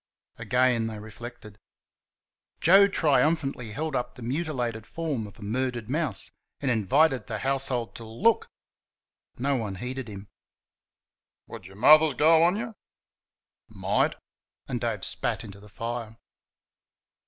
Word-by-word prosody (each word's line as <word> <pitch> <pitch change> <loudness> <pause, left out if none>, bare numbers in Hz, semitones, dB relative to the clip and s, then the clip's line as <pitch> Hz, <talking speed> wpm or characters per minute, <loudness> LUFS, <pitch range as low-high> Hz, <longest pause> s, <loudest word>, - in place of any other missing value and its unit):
Again 125 -2 +2
they 110 -1 -5
reflected. 110 -1 -10 1.0
Joe 195 +4 +7
triumphantly 145 - +1
held 150 +5 -3
up 125 - -2
the 125 - -10
mutilated 120 -5 -2
form 150 -10 -3
of 100 - -15
a 115 - -11
murdered 120 +1 -2
mouse 145 -10 -2 0.3
and 135 -3 0
invited 130 +3 +2
the 110 - -3
household 130 -1 -1
to 115 - -8
"Look!" 145 - +1 0.9
No 140 +3 +1
one 105 -5 -3
heeded 125 +4 -5
him. 100 -1 -9 1.2
"Would - - -10
your 95 - -14
Mother's 155 +6 +6
go 160 +4 +5
on 175 +3 +4
you?" 230 +1 -4 1.0
"Might," - - 0 0.5
and - - -3
Dave - - -2
spat - - -2
into 100 0 -10
the 105 +1 -15
fire. 115 +1 -5
125 Hz, 130 wpm, -27 LUFS, 110-150 Hz, 1.2 s, Joe